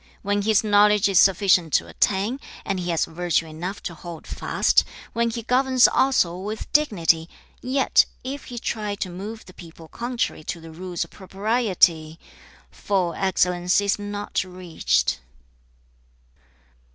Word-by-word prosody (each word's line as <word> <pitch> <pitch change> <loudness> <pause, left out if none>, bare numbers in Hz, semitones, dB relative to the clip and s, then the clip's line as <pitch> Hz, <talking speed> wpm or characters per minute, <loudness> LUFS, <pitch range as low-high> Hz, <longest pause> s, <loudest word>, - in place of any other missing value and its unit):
3. - - -29 0.2
'When 205 +1 0
his 215 +1 +2
knowledge 210 -1 +4
is 195 -3 +4
sufficient 185 -4 +4
to - - +2
attain, 205 +7 0 0.3
and 195 -2 -2
he 175 0 -4
has 165 -2 +1
virtue 170 0 -1
enough 170 +5 -6
to 175 - -5
hold 170 0 -10
fast; - - +1 0.3
when 235 0 +1
he 230 0 -5
governs 255 +1 +4
also 255 -11 +2
with 210 +3 -6
dignity, 170 - +2 0.3
yet 260 +1 +3 0.2
if 270 +2 -6
he 245 - -8
try 210 -3 -3
to 190 -2 -4
move 210 +5 -8
the 185 - -14
people 165 -2 -13
contrary 240 -5 -3
to 170 - -4
the 165 0 -11
rules 175 +1 -4
of - - -13
propriety: 190 -6 0 0.5
full 185 -4 -1
excellence 180 -1 +1
is 200 0 0
not 205 -1 -3
reached.' 175 - -1
195 Hz, 145 wpm, -23 LUFS, 175-220 Hz, 0.5 s, knowledge